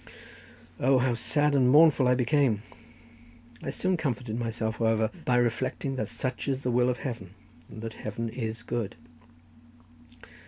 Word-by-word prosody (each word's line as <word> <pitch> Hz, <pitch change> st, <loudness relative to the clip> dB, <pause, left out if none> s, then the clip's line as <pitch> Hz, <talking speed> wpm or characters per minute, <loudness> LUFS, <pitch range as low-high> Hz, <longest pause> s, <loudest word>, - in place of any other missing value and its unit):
O, 135 Hz, +2 st, +4 dB
how 125 Hz, 0 st, +2 dB
sad 145 Hz, +5 st, +1 dB
and 130 Hz, -3 st, +4 dB
mournful 145 Hz, -2 st, +6 dB
I 125 Hz, -, +4 dB
became! 125 Hz, -4 st, +2 dB, 1.0 s
I -, -, -4 dB
soon 185 Hz, -1 st, 0 dB
comforted 125 Hz, -7 st, -2 dB
myself, 115 Hz, -1 st, -2 dB
however, 110 Hz, -1 st, +1 dB
by 125 Hz, -, +2 dB
reflecting 125 Hz, +3 st, 0 dB
that 110 Hz, -4 st, -2 dB
such 120 Hz, +1 st, -4 dB
is 135 Hz, 0 st, -1 dB
the 125 Hz, -, 0 dB
will 125 Hz, +1 st, +3 dB
of 125 Hz, -, -1 dB
Heaven, 110 Hz, -8 st, -6 dB, 0.3 s
and 110 Hz, -, -9 dB
that 115 Hz, -1 st, -5 dB
Heaven 110 Hz, +2 st, -5 dB
is 115 Hz, -1 st, -4 dB
good. 115 Hz, -5 st, -3 dB
120 Hz, 150 wpm, -28 LUFS, 115-130 Hz, 1.0 s, mournful